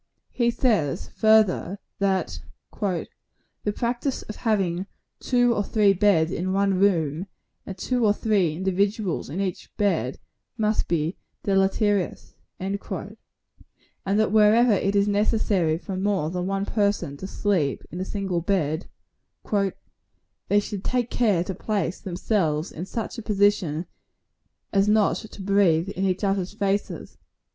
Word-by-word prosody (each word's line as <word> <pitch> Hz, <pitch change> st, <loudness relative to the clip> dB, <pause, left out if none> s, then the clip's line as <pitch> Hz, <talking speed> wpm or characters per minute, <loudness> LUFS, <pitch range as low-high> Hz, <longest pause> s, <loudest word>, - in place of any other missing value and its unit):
He 240 Hz, -2 st, +1 dB
says, 210 Hz, -, 0 dB
further, 215 Hz, -4 st, +3 dB, 0.2 s
that 195 Hz, -1 st, 0 dB, 0.4 s
"the 200 Hz, +1 st, -5 dB
practice 240 Hz, +4 st, -2 dB
of 215 Hz, -, -8 dB
having 195 Hz, -5 st, 0 dB, 0.3 s
two 245 Hz, -1 st, +3 dB
or 205 Hz, -, 0 dB
three 205 Hz, -1 st, +3 dB
beds 185 Hz, -5 st, +3 dB
in 185 Hz, +2 st, -2 dB
one 195 Hz, -1 st, +2 dB
room, 170 Hz, -3 st, +1 dB, 0.4 s
and 190 Hz, -, -6 dB
two 245 Hz, +5 st, -1 dB
or 210 Hz, -, +5 dB
three 200 Hz, -7 st, +1 dB
individuals 190 Hz, -, -1 dB
in 160 Hz, +7 st, -4 dB
each 190 Hz, -3 st, -3 dB
bed, 165 Hz, -, 0 dB, 0.4 s
must 215 Hz, -1 st, +1 dB
be 165 Hz, +1 st, -1 dB, 0.3 s
deleterious;" 195 Hz, 0 st, +1 dB, 0.3 s
and 195 Hz, +2 st, -2 dB, 1.3 s
that 205 Hz, +1 st, +2 dB
wherever 220 Hz, +3 st, +5 dB
it 200 Hz, 0 st, +1 dB
is 200 Hz, 0 st, +3 dB
necessary 205 Hz, -5 st, +1 dB
for 190 Hz, +2 st, -6 dB
more 190 Hz, -5 st, 0 dB
than 180 Hz, 0 st, -2 dB
one 195 Hz, 0 st, -1 dB
person 205 Hz, -10 st, 0 dB
to 190 Hz, -, -6 dB
sleep 185 Hz, -9 st, 0 dB
in 175 Hz, -, -6 dB
a -, -, -1 dB
single 190 Hz, -3 st, -2 dB
bed, 165 Hz, -3 st, 0 dB, 0.6 s
"they 200 Hz, 0 st, -3 dB
should 205 Hz, -1 st, -5 dB
take 245 Hz, -2 st, -1 dB
care 205 Hz, -8 st, +2 dB
to 190 Hz, -, -4 dB
place 190 Hz, -4 st, -2 dB
themselves 175 Hz, -4 st, -1 dB
in 175 Hz, +4 st, -6 dB
such 230 Hz, +3 st, -4 dB
a -, -, -5 dB
position 200 Hz, -6 st, +1 dB, 0.9 s
as 195 Hz, 0 st, +3 dB
not 210 Hz, -1 st, +3 dB
to 215 Hz, -2 st, -10 dB
breathe 190 Hz, -3 st, +3 dB
in 195 Hz, -1 st, -2 dB
each 185 Hz, +2 st, 0 dB
others' 195 Hz, -1 st, 0 dB
faces." 200 Hz, -1 st, -2 dB
195 Hz, 135 wpm, -25 LUFS, 180-210 Hz, 1.3 s, or